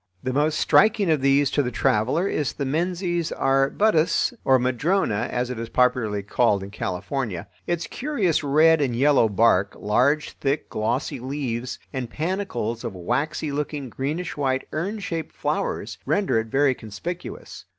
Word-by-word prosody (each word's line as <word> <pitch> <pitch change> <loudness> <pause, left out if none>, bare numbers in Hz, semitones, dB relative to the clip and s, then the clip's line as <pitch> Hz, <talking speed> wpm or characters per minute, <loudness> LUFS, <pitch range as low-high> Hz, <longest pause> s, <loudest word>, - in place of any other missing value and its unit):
The 130 - -2
most 150 +3 +1
striking 205 -4 +4
of 155 -3 +2
these 140 0 +3
to 145 - +2
the 125 - -1
traveler 125 - +1
is 150 -7 -1
the 140 - -3
Menzies 175 +3 -1
arbutus, 155 - +2
or 130 -1 +5
madrona, 130 - 0
as 125 0 -1
it 125 - -5
is 115 0 -5
popularly 115 -5 +1
called 100 -1 +1
in 100 - -8
California. 100 0 -3 0.2
Its 175 -1 -1
curious 205 - -1
red 155 +3 +4
and 130 -4 0
yellow 135 -3 +4
bark, 100 -2 +3
large 130 +9 +2
thick 140 +2 -1
glossy 130 +6 -1
leaves, 125 -2 -3 0.2
and 130 -3 -3
panicles 150 - -3
of 115 -5 -5
waxy 140 - -2
looking 145 -2 -3
greenish 150 +8 -3
white 135 -2 -1
urn 190 +8 -2
shaped 170 -6 -5
flowers - - -2
render 200 - +2
it 110 - -4
very 135 +3 +3
conspicuous. 125 - -7
135 Hz, 150 wpm, -24 LUFS, 120-160 Hz, 0.2 s, or